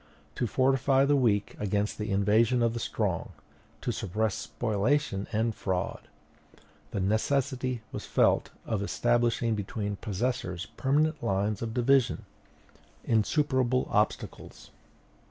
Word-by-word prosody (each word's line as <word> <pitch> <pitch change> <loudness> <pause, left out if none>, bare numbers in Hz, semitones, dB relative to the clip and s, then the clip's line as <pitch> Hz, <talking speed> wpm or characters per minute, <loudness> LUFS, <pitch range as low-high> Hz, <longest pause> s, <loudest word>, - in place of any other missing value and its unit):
To 120 - -1
fortify 135 +2 +3
the 145 +1 +3
weak 110 -7 +1
against 105 +1 -1
the 105 +1 -3
invasion 110 +5 +3
of 115 -1 +2
the 115 - -3
strong, - - -2 0.5
to - - -1
suppress 110 +3 -1
spoliation 110 -1 -1
and 110 +1 +1
fraud, 95 -3 -3 0.8
the 100 - -3
necessity 125 +4 0
was - - -6
felt - - +3 0.2
of 110 -3 -1
establishing 120 +2 +1
between 105 -1 -3
possessors 105 -4 -2
permanent 150 +3 +1
lines 100 0 0
of 115 -1 -4
division, 130 +1 +2 0.8
insuperable 130 +2 +1
obstacles. - - -2
115 Hz, 115 wpm, -29 LUFS, 105-130 Hz, 0.8 s, fortify